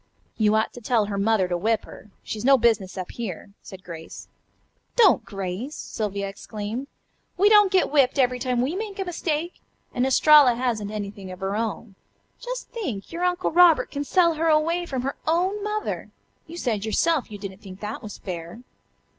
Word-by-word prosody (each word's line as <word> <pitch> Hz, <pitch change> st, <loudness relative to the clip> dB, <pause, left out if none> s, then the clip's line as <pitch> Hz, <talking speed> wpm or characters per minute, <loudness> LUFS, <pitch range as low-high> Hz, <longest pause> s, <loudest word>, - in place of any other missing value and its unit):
"You 215 Hz, -1 st, +3 dB
ought 220 Hz, 0 st, +1 dB
to 245 Hz, -, -10 dB
tell 225 Hz, -2 st, +2 dB
her 200 Hz, -1 st, -4 dB
mother 205 Hz, -2 st, +2 dB
to 180 Hz, -, -1 dB
whip 220 Hz, +5 st, 0 dB
her. 210 Hz, -, -13 dB
She's 215 Hz, 0 st, -5 dB
no 270 Hz, +1 st, +6 dB
business 215 Hz, -6 st, +1 dB
up 185 Hz, -1 st, -5 dB
here," 205 Hz, -4 st, -6 dB
said 190 Hz, -1 st, -12 dB
Grace. 165 Hz, -2 st, -9 dB, 0.7 s
"Don't, 445 Hz, -6 st, +5 dB
Grace!" 195 Hz, -, -5 dB
Sylvia 200 Hz, -2 st, -4 dB
exclaimed. 210 Hz, +5 st, -6 dB, 0.5 s
"We 400 Hz, +3 st, +5 dB
don't 415 Hz, -2 st, +6 dB
get 375 Hz, -6 st, +2 dB
whipped 275 Hz, -3 st, +3 dB
every 250 Hz, -2 st, +2 dB
time 250 Hz, -1 st, 0 dB
we 290 Hz, +7 st, -1 dB
make 410 Hz, -1 st, -5 dB
a 385 Hz, -, -2 dB
mistake. 335 Hz, -1 st, -3 dB, 0.3 s
And 245 Hz, -, 0 dB
Estralla 280 Hz, -2 st, +6 dB
hasn't 235 Hz, -4 st, -1 dB
anything 200 Hz, -2 st, -6 dB
of 185 Hz, -, -9 dB
her 195 Hz, +1 st, -2 dB
own. 225 Hz, -1 st, -3 dB, 0.5 s
Just -, -, -6 dB
think, 270 Hz, -, -5 dB
your 340 Hz, +2 st, -4 dB
Uncle 360 Hz, 0 st, 0 dB
Robert 345 Hz, -1 st, +5 dB
can 285 Hz, 0 st, -3 dB
sell 340 Hz, +2 st, +3 dB
her 320 Hz, +1 st, -1 dB
away 330 Hz, +3 st, +2 dB
from 260 Hz, -4 st, -3 dB
her 275 Hz, -, -3 dB
own 370 Hz, +5 st, +1 dB
mother. 425 Hz, 0 st, -3 dB, 0.4 s
You 335 Hz, +2 st, -9 dB
said 220 Hz, -10 st, -1 dB
yourself 285 Hz, +7 st, +1 dB
that -, -, -23 dB
you -, -, -6 dB
didn't 195 Hz, -1 st, -8 dB
think 190 Hz, -1 st, -11 dB
that 210 Hz, +1 st, -5 dB
was 210 Hz, -1 st, -8 dB
fair." 175 Hz, +5 st, -7 dB
245 Hz, 190 wpm, -24 LUFS, 205-330 Hz, 0.7 s, no